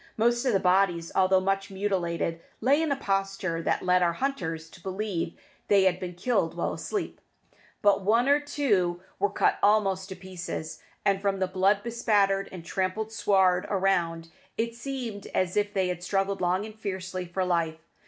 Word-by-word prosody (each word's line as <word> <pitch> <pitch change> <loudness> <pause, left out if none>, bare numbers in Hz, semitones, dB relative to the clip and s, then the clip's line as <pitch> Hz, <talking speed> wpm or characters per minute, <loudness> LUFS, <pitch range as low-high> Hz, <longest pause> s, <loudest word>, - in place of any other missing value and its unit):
Most 240 +2 +2
of 250 - +2
the 195 - +4
bodies, 180 -2 +2
although 190 0 +4
much 195 +2 -1
mutilated, 175 -4 -1 0.2
lay 275 +6 +3
in 320 -2 0
a - - +3
posture 195 -6 -1
that - - 0
led 180 0 +3
our 170 -1 +3
hunters 165 - -3
to 185 - -15
believe 190 -2 -3 0.3
they 200 -2 +5
had 185 -1 +2
been 180 -1 -6
killed 180 -4 0
while - - -1
asleep; 410 - -4 0.6
but 205 -1 +4
one 230 +6 +3
or 285 +1 +5
two 210 -12 0 0.2
were 205 +1 +2
cut 205 - +1
almost 195 -2 +2
to 190 - -6
pieces, 180 -4 -6 0.2
and 195 -1 +2
from 200 -1 0
the 190 - +1
blood 190 +2 +2
bespattered 205 -4 +1
and 175 -3 -9
trampled 195 +4 -2
sward 190 -4 +2
around, 175 -4 0 0.3
it 230 +1 -1
seemed 235 -4 -5
as 185 -1 +1
if 205 0 +1
they 190 -3 0
had 175 -1 -3
struggled 195 +1 0
long 185 +3 +1
and 220 0 -11
fiercely 185 -3 -4
for 185 +2 -1
life. 165 -3 0
195 Hz, 175 wpm, -27 LUFS, 180-210 Hz, 0.6 s, they